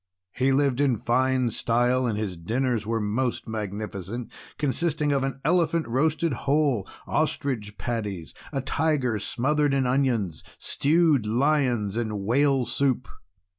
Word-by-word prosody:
He 130 +1 +2
lived 140 -1 +2
in 135 -5 +2
fine 130 +2 +1
style, 120 +3 +1
and 110 -3 -1
his 105 -4 -3
dinners 115 +5 -1
were 115 0 0
most 115 +5 -1
magnificent, 105 +1 -5 0.3
consisting 150 +1 0
of 140 -1 +1
an 135 -1 -3
elephant 165 -2 +2
roasted 150 +5 +1
whole, 140 -4 +1 0.2
ostrich 105 -7 -1
patties, 105 - -4 0.2
a 135 - -1
tiger 135 -6 0
smothered 145 +6 +1
in 135 -1 +1
onions, 125 - 0
stewed 150 -6 +2
lions, 120 -4 +1
and 110 -4 -2
whale 135 +4 +2
soup. 125 0 0
125 Hz, 130 wpm, -26 LUFS, 110-140 Hz, 0.3 s, He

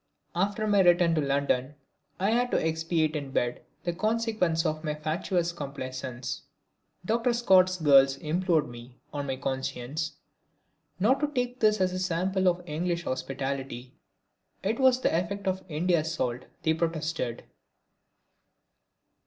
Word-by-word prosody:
After 205 +5 0
my 205 -1 +3
return 175 -2 +5
to 155 - +2
London 140 -1 0 0.4
I 195 +3 +2
had 245 +2 +2
to - - +2
expiate 160 -1 0
in 145 -2 -3
bed 120 -2 -1 0.2
the 175 - -1
consequences 215 -4 0
of 155 0 -1
my 150 -1 -2
fatuous 165 +3 -1
complaisance. 130 -5 -5 0.6
Dr. 230 +4 +1
Scott's 185 -6 +4
girls 135 -4 +5
implored 160 0 +1
me, 120 +1 -11 0.2
on 145 -1 -3
my 135 - -1
conscience, 135 +3 -3 0.9
not 250 +8 +3
to 295 - +1
take 250 -3 -2
this 215 -1 +3
as 185 -1 +1
a 185 - -2
sample 185 +1 0
of 180 0 +1
English 170 +2 -1
hospitality. 135 -2 -4 0.7
It 220 +5 0
was 260 -1 +5
the 210 - +1
effect 195 +4 -2
of 190 0 -1
India's 160 0 +1
salt, 125 -5 -2 0.2
they 160 - +3
protested. 160 -7 -2
165 Hz, 135 wpm, -28 LUFS, 140-190 Hz, 0.9 s, return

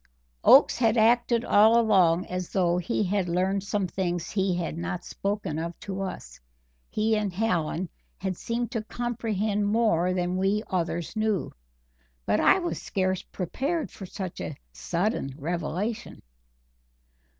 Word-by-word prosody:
Oakes - - +7
had 230 -1 +3
acted 235 +1 +3
all 220 +3 +6
along 185 -6 +4
as 180 -1 -4
though 175 -2 +1
he 210 +4 -1
had 190 -2 0
learned 190 +3 0
some 200 -1 -1
things 175 -2 -2
he 190 -3 +1
had 170 -2 -3
not 180 +1 -4
spoken 195 -6 -3
of 170 +1 -5
to 195 -1 -4
us 65 - -6 0.5
he 220 +1 +1
and 210 -2 -1
Hallen 180 -3 -1 0.3
had 190 +1 -3
seemed 235 +5 -3
to 225 - -1
comprehend 220 -4 -1
more 205 -5 +2
than 180 0 -1
we 195 +3 +1
others 170 0 -2
knew; 215 -3 0 0.7
but - - +2
I - - +5
was 350 -2 -3
scarce 185 -1 -1
prepared 275 - -3
for 190 - -9
such 185 -1 -6
a 150 - -5 0.2
sudden 170 - -2
revelation. 175 +7 -3
195 Hz, 140 wpm, -27 LUFS, 175-220 Hz, 0.7 s, Oakes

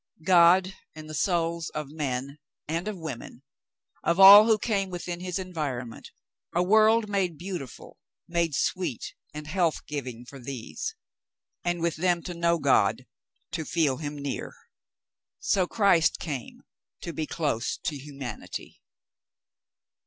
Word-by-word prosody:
God 180 +1 +5 0.2
and 155 0 -9
the 155 - -8
souls 170 0 0
of 150 -2 -4
men 140 -1 -4 0.3
and 165 +5 -2
of 210 -2 -3
women 140 -5 -8 0.3
— - - -41
of 170 +2 +1
all 200 +3 +11
who 220 -1 +4
came 200 -3 -1
within 175 -1 -5
his 180 -1 -3
environment 150 -11 -5 0.2
— - - -30
a 175 - +3
world 220 +3 +4
made 190 -5 -1
beautiful, 175 - -8 0.3
made 170 -3 0
sweet 180 -10 -2 0.2
and 150 0 -8
health 170 0 0
giving 125 -5 -6
for 135 +2 -11
these 135 - -6 0.3
— - - -59
and 175 -1 -1
with 170 -2 0
them 175 0 +1
to 180 - -5
know 170 0 +1
God, - - +2 0.5
to 165 - -3
feel 155 -5 +1
Him 150 -1 -5
near. 140 -1 -5 0.8
So 185 -3 +1
Christ 190 -7 +3
came 140 -7 -6 0.4
to 170 - -5
be 155 -1 -3
close 145 -8 -1
to 150 - -2
humanity. 135 - -8
170 Hz, 145 wpm, -27 LUFS, 145-185 Hz, 0.8 s, all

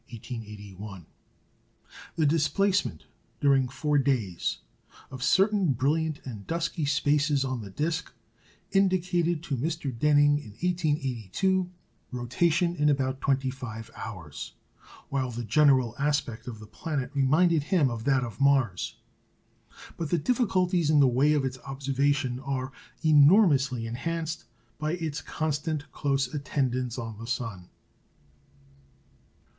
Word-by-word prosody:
The 160 - +2
displacement, 165 - +1 0.3
during 135 -2 +3
four 145 +2 +1
days, 120 -11 0 0.5
of 130 -1 -8
certain 195 - +3
brilliant 150 +4 0
and 110 -6 -8
dusky 165 -1 -1
spaces 145 -1 +2
on 130 -3 -3
the 100 - -8
disc 160 - -2 0.6
indicated 175 -4 +2
to 145 - -2
Mr. 150 -1 -2
Denning 145 +2 +4
in 110 -8 -11
1882 160 - 0 0.4
rotation 165 +8 +1
in 150 -2 +2
about 135 -2 0
twenty 135 -1 +1
five 115 -4 -8
hours; 85 -10 -7 0.6
while 130 -2 -1
the 120 0 -5
general 130 0 +4
aspect 140 -6 -1
of 120 -3 -6
the 110 - -11
planet 140 +4 -4
reminded 155 +4 +3
him 145 -3 +2
of 115 -1 -5
that 135 -2 +3
of 120 +3 -7
Mars. 135 -9 +2 1.0
But 165 -3 -3
the 175 - +2
difficulties 180 - +1
in 155 -1 +5
the 140 - +6
way 135 +5 +3
of 145 -3 +1
its 130 0 -4
observation 135 -1 -1
are 135 -1 -3 0.3
enormously 145 - +5
enhanced 160 +7 -3 0.3
by 155 +1 -1
its 160 -3 -3
constant 155 -1 -3
close 135 -3 -1
attendance 130 -4 -1
on 115 -3 -6
the 115 - -7
sun. 115 -7 -4
140 Hz, 120 wpm, -27 LUFS, 125-160 Hz, 1.0 s, the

